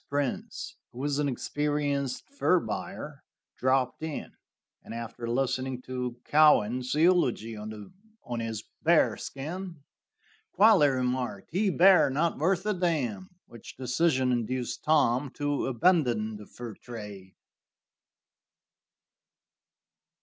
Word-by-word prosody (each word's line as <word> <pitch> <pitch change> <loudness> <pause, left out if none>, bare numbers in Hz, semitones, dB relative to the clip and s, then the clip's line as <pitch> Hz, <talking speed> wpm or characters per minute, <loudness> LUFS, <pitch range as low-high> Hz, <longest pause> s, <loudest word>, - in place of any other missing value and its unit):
Prince, 140 -2 -3
who - - -15
was 140 +2 -1
an 145 -1 +1
experienced 145 -1 -2
fur 225 -10 +3
buyer, 155 -6 -6 0.4
dropped 130 0 +1
in, 160 -2 -5 0.5
and - - -9
after 115 0 -6
listening 130 +1 -1
to 125 -1 -4
Cowan's 130 -4 +4
eulogy 150 - +2
on 120 - -9
his 115 -2 -4 0.2
bear - - +4
skin, 165 +3 -7 0.7
quietly 200 -6 +6
remarked: 125 -5 -2
"He 195 +4 +1
bear; 185 -1 +6
not 155 +5 0
worth 185 +4 +1
a 210 - +1
d 180 -1 0
n," 120 - -2 0.2
which 115 - -12
decision 130 +1 +1
induced 120 +1 -2
Tom 140 -3 +3
to 145 -1 -1
abandon 125 -7 +2
the 105 - -12
fur 120 -2 -8
trade. 105 -5 -10
135 Hz, 110 wpm, -28 LUFS, 120-160 Hz, 0.7 s, quietly